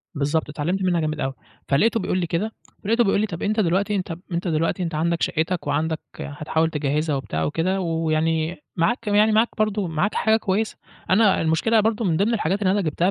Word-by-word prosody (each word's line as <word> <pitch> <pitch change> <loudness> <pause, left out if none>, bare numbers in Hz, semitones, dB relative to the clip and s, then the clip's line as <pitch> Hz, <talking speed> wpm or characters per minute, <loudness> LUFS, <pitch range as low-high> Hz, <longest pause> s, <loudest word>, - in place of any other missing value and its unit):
بالضبط. 150 +2 0
اتعلمت 170 +6 -2
منها 175 -2 +2
جامد 155 0 -2
أوي. 135 -1 -1 0.3
فلقيته 225 +11 +3
بيقول 185 - -1
لي 175 - -1
كده، 175 +7 -1 0.3
ولقيته 230 +3 +3
بيقول 200 -1 +2
لي: - - +2
"طَب 170 -4 -7
أنت 215 +2 0
دلوقتي 200 +3 +1
أنت 180 -3 -3 0.2
أنت 175 +2 -2
دلوقتي 165 +3 0
أنت 165 -2 -3
عندك 170 +2 0
شقتك 165 0 -1
وعندك 155 +2 0 0.2
هتحاول 155 +2 -1
تجهِّزها 150 0 -1
وبتاع 80 - -3
وكده، 185 - 0
ويعني 160 -1 0 0.2
معاك 225 +7 0
يعني 210 +1 +4
معاك 220 +2 +3
برضو 210 -3 0
معاك 165 +6 -1
حاجة 220 0 +3
كويسة." 215 +1 -1 0.3
أنا 200 +1 +4
المشكلة 165 +8 +2
برضو 220 +1 +1
من 165 -6 +1
ضِمْن 215 +4 +2
الحاجات 200 -1 0
اللي 185 -1 +3
أنا 205 0 +2
جِبتها 170 +3 +1
170 Hz, 195 wpm, -23 LUFS, 155-205 Hz, 0.3 s, يعني